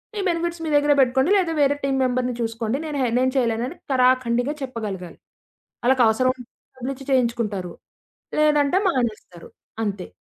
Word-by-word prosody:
మీ - - -3
benefits 340 0 -2
మీ - - -2
దగ్గరే 290 0 +4
బెట్టుకోండి 265 +6 +2
లేదా 345 -4 0
వేరే 285 0 +3
టీమ్ 270 -1 0
మెంబర్‌ని 250 -1 -1
చూసుకోండి, 230 +2 -2
నేను 290 -2 -3
హె 245 - +1
నేను 260 0 +1
చేయలేను 230 -1 +1
అని 350 - -11 0.2
తరాఖండిగా 255 +1 +2
చెప్పగలగాలి. 205 -9 -6 0.7
వాళ్ళకవసరం 255 0 +3
ఉంటే 245 - -12 0.3
డబ్బులిచ్చి 265 +2 -5
చేయించుకుంటారు, 230 -8 0 0.7
లేదంటే 300 +2 +3
మానేస్తారు 220 - -3 0.3
అంతే. 200 -3 -3
255 Hz, 140 wpm, -23 LUFS, 230-280 Hz, 0.7 s, దగ్గరే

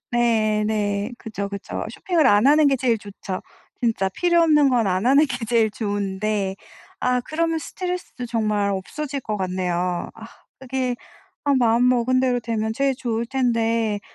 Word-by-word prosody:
네. 220 -3 +2
네. 210 +1 -1
그죠, 205 -2 -5
그죠. 200 0 -5
쇼핑을 340 -6 +1
안 210 +1 +5
하는 300 +1 +6
게 275 -1 +3
제일 240 -3 +1
좋죠. 200 -2 -7 0.4
진짜 220 -5 +1
필요 345 - +2
없는 300 -3 +5
건 235 -4 +2
안 190 +4 0
하는 280 +4 +5
게 245 -4 -4
제일 225 -1 +2
좋은데 200 -1 -2 0.4
아 250 0 +1
그러면 325 +4 -1
스트레스도 360 -6 -5
정말 215 -3 0
없어질 275 +9 -4
것 215 -3 -3
같네요. 180 -1 -2
아 225 0 -11 0.3
그게 255 -1 -2 0.5
아 285 -1 +3
마음먹은 250 +1 +3
대로 250 -2 +1
되면 220 -1 -2
제일 275 +2 +1
좋을 235 -2 -2
텐데 230 -4 0
230 Hz, 295 characters per minute, -22 LUFS, 205-260 Hz, 0.5 s, 하는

